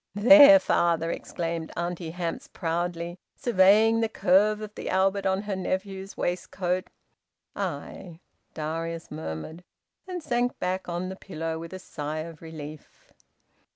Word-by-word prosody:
"There, 290 +7 +9
father!" 170 - +1
exclaimed 165 -2 -4
Auntie 175 -1 -3
Hamps 170 0 -4
proudly, 170 +1 -3 0.2
surveying 220 +1 +4
the 225 -1 +1
curve 210 +2 +3
of 215 -1 -7
the - - -6
Albert 195 +1 +2
on 190 +1 0
her 205 -2 -3
nephew's 190 +1 -4
waistcoat. 180 +1 -2 0.7
"Ay!" 170 -4 -5 0.4
Darius 165 +2 -4
murmured, 155 - -6 0.4
and 360 -3 -5
sank 245 -1 0
back 185 0 -2
on 175 +2 -3
the 190 - -6
pillow 165 -4 -5
with 165 0 -8
a 185 - -6
sigh 155 -4 -5
of 165 -1 -9
relief. 155 -2 -11
180 Hz, 130 wpm, -27 LUFS, 165-195 Hz, 0.7 s, There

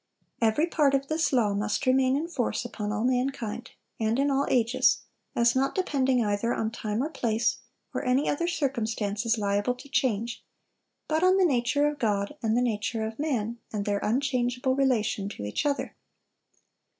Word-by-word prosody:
Every 225 +8 +3
part 295 -5 +2
of 275 0 -2
this 315 -1 +1
law 230 -6 +2
must 210 +1 -1
remain 260 0 +3
in 320 +3 -2
force 260 -8 -2
upon 210 -3 -4
all 215 +1 -1
mankind, 250 -3 -1 0.3
and 220 +1 +1
in 280 +1 +2
all 275 +1 +1
ages; 240 0 +3 0.3
as 235 +1 +3
not 270 +1 +1
depending 265 - +1
either 205 +3 0
on 220 0 -1
time 220 +1 -2
or 300 - -2
place, 230 -4 0 0.4
or - - -2
any 255 +2 +2
other 335 +4 0
circumstances 230 -7 -1
liable 205 +3 0
to 270 - -13
change, 235 -4 -1 0.6
but 315 +1 +1
on 370 +1 +5
the 380 - +4
nature 270 0 +2
of 295 0 -3
God, 205 +2 0
and 225 -1 +1
the 245 - +3
nature 225 -1 -1
of 220 +3 -6
man, 240 -6 -1
and 205 -2 -3
their 205 -1 0
unchangeable 250 +1 0
relation 225 -7 +1
to 150 - -8
each 105 - -1
other. 285 -1 -2
245 Hz, 175 wpm, -27 LUFS, 220-275 Hz, 0.6 s, on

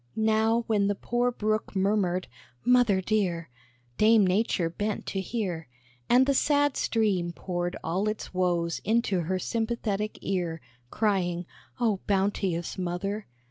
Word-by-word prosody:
Now 220 +1 +2
when 205 -3 +2
the 205 - +1
poor 240 +4 0
Brook 215 -2 -2
murmured, 190 -2 +1 0.4
"Mother 245 -6 +4
dear!" 180 - -1 0.5
Dame 215 -1 +6
Nature 185 -2 +1
bent 205 +5 -3
to 195 - -2
hear, 185 - -3 0.4
And 250 +2 +6
the 280 - +2
sad 290 0 +2
stream 195 -7 0
poured 175 0 -3
all 190 +6 0
its 215 - -5
woes 175 -2 0
into 220 -3 +1
her 180 +3 -1
sympathetic 220 0 -2
ear, 175 -4 -1 0.3
Crying, 180 - 0 0.3
"Oh, 220 -5 +1
bounteous 190 -3 0
Mother! 195 +4 -3
200 Hz, 130 wpm, -27 LUFS, 180-220 Hz, 0.5 s, Dame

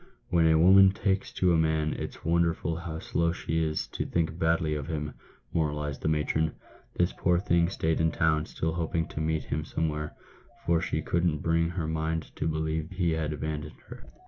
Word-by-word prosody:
" - - -39
When 85 -2 +4
a 80 0 +5
woman 95 +4 +7
takes 95 -1 0
to 90 -2 +2
a - - +4
man, 80 -1 +1
it's - - -7
wonderful 85 0 +1
how 80 -1 -5
slow 85 +1 0
she 80 -2 -1
is 80 0 -1
to - - -3
think 80 0 -1
badly 80 -1 +2
of 75 -1 -4
him," 75 -2 -3 0.4
moralised 75 -3 -1
the - - -1
matron. 80 0 +1 0.4
"This 90 +1 +1
poor 90 0 +2
thing 85 -2 +2
stayed 80 -3 0
in 80 - +3
town, 80 -1 +1
still 80 0 -2
hoping 80 -1 -1
to 75 - -4
meet 80 0 0
with - - -16
him 75 +1 0
somewhere, 75 -1 -3 0.5
for 85 -1 +3
she - - -2
couldn't 85 -3 0
bring 85 0 +2
her 85 -1 -3
mind 80 0 -2
to - - -1
believe 80 0 -1
he 90 -2 0
had 80 -1 -1
abandoned 75 0 -4
her. - - -10
80 Hz, 200 wpm, -28 LUFS, 80-85 Hz, 0.5 s, woman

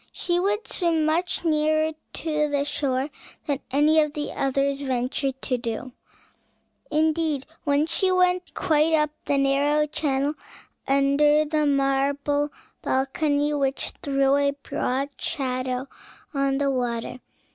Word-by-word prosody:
She 350 0 0
would 415 +4 0
swim 330 -3 +1
much 340 +3 0
nearer 310 0 +2 0.2
the 300 -3 0
shore 280 -1 -1 0.3
than 285 -3 -1
any 300 +4 +4
of 300 -1 -1
the 295 -1 -3
others 275 +1 0
ventured 265 +1 -1
to 250 -2 0
do; 235 +2 -4 1.0
indeed 310 -2 +1 0.2
once 295 +2 +2
she 375 +2 +2
went 365 0 +1
quite 320 -3 +2
up 300 -1 +1
the 285 - +1
narrow 285 +2 +2
channel 290 -2 -1 0.5
under 280 +2 +4
the 305 0 +1
marble 280 +1 +1 0.3
balcony, 290 +2 0
which 275 -2 -1
threw 275 0 +2
a 280 0 +2
broad 270 +3 -1
shadow 255 -1 -2 0.5
on 275 -1 +1
the 280 0 +1
water. 245 -1 -2
285 Hz, 125 wpm, -24 LUFS, 275-310 Hz, 1.0 s, any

